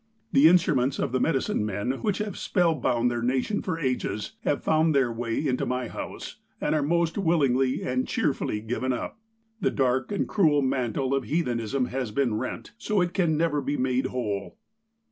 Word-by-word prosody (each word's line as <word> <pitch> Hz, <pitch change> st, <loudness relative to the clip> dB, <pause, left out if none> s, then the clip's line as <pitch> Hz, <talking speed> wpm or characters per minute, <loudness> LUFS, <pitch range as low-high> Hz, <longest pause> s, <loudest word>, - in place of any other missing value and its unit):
"The 140 Hz, +3 st, +7 dB
instruments 150 Hz, -7 st, +3 dB
of -, -, -1 dB
the 130 Hz, -, +1 dB
medicine 135 Hz, -8 st, +1 dB
men, 105 Hz, +3 st, -1 dB
which 205 Hz, -3 st, 0 dB
have 210 Hz, -3 st, -3 dB
spell 175 Hz, -3 st, +2 dB
bound 120 Hz, -5 st, +1 dB
their 120 Hz, 0 st, -2 dB
nation 130 Hz, -, 0 dB
for 180 Hz, -4 st, -2 dB
ages, 125 Hz, -8 st, -2 dB
have 145 Hz, -, -1 dB
found 155 Hz, -1 st, +3 dB
their 130 Hz, -3 st, +3 dB
way 115 Hz, +4 st, -2 dB
into 130 Hz, -3 st, 0 dB
my 125 Hz, 0 st, -2 dB
house, -, -, -7 dB, 0.2 s
and -, -, 0 dB
are 155 Hz, -, +2 dB
most 170 Hz, +4 st, +1 dB
willingly 135 Hz, -8 st, +2 dB
and 125 Hz, 0 st, -1 dB
cheerfully 105 Hz, -, -1 dB
given 125 Hz, +3 st, -1 dB
up. 125 Hz, -, -5 dB, 0.4 s
The -, -, +2 dB
dark 130 Hz, +4 st, 0 dB
and 200 Hz, -, -1 dB
cruel 155 Hz, -8 st, +3 dB
mantle 130 Hz, 0 st, 0 dB
of 135 Hz, -3 st, 0 dB
heathenism 125 Hz, -3 st, 0 dB
has 130 Hz, -2 st, -2 dB
been 120 Hz, +1 st, 0 dB
rent, 130 Hz, -, -5 dB
so 210 Hz, -4 st, 0 dB
it 175 Hz, -1 st, 0 dB
can 165 Hz, -5 st, +2 dB
never 155 Hz, -3 st, +1 dB
be 145 Hz, +1 st, -2 dB
made 130 Hz, 0 st, +1 dB
whole. 105 Hz, -, -3 dB
135 Hz, 185 wpm, -26 LUFS, 125-160 Hz, 0.4 s, The